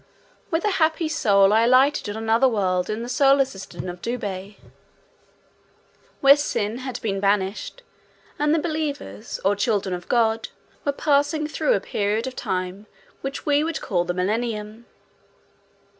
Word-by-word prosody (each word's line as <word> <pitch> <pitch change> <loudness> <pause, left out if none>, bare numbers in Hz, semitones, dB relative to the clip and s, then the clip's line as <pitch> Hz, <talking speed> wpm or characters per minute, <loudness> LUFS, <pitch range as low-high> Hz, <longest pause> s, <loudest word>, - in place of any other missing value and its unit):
With 325 +3 0
a 420 - +2
happy 315 +1 +2
soul 205 -9 +3
I 220 - +5
alighted 260 0 +3
on 220 +2 -5
another 225 +4 +4
world 185 -6 0
in 215 +2 -3
the - - -6
solar 275 +2 +4
system 195 -6 -8
of 175 0 -7
Dubhe 205 -4 -4 1.7
where 275 0 +8
sin 230 -6 -2
had 260 -1 -5
been 195 -3 -1
banished, 200 - -1 0.6
and 295 0 +2
the 320 - +3
believers, 305 -7 -4
or 200 +1 +3
children 205 -2 0
of 175 -1 -6
God, 225 -2 +1 0.4
were 285 - +2
passing 290 +2 +1
through 310 +11 0
a - - +1
period 210 +3 -1
of 260 -1 -5
time 185 +3 -4 0.3
which 270 0 -5
we 290 0 +3
would 325 0 -2
call 180 -6 0
the 175 0 -3
Millennium. 215 +3 -2
225 Hz, 150 wpm, -23 LUFS, 200-280 Hz, 1.7 s, where